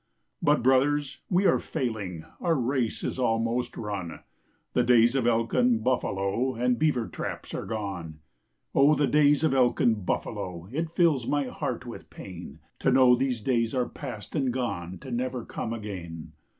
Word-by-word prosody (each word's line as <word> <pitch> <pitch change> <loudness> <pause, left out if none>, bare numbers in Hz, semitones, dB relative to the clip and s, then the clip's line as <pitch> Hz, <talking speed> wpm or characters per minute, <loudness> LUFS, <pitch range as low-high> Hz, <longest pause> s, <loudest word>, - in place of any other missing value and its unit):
But 150 -6 +3
brothers, 140 +2 +2
we 190 +1 +2
are - - +4
failing, 105 - -4
Our 170 -2 +1
race 125 -3 -1
is - - -3
almost 115 0 0
run; 100 -6 -5 0.5
The - - +3
days 120 -1 +5
of 130 -3 +1
elk 115 -1 +1
and 120 -3 +3
buffalo 120 0 0
And 125 +1 +1
beaver 145 -7 +1
traps - - -6
are - - -4
gone 95 -8 -4 0.6
Oh, 140 +3 +5
the 145 +1 +2
days 145 0 +4
of 160 - +3
elk 125 -2 +3
and 110 -4 +2
buffalo! 90 -1 -3
It 160 +4 -2
fills 160 -7 +2
my 145 -1 +1
heart - - -4
with - - -9
pain - - -9 0.2
To 135 - +2
know 130 -1 +6
these 125 -2 -1
days 115 0 0
are 125 -1 +1
past 120 -4 -8
and 135 -4 +1
gone 95 -8 -3
To 130 -1 -10
never 125 0 -2
come 115 - -4
again. 90 -8 -6
125 Hz, 165 wpm, -27 LUFS, 110-135 Hz, 0.6 s, know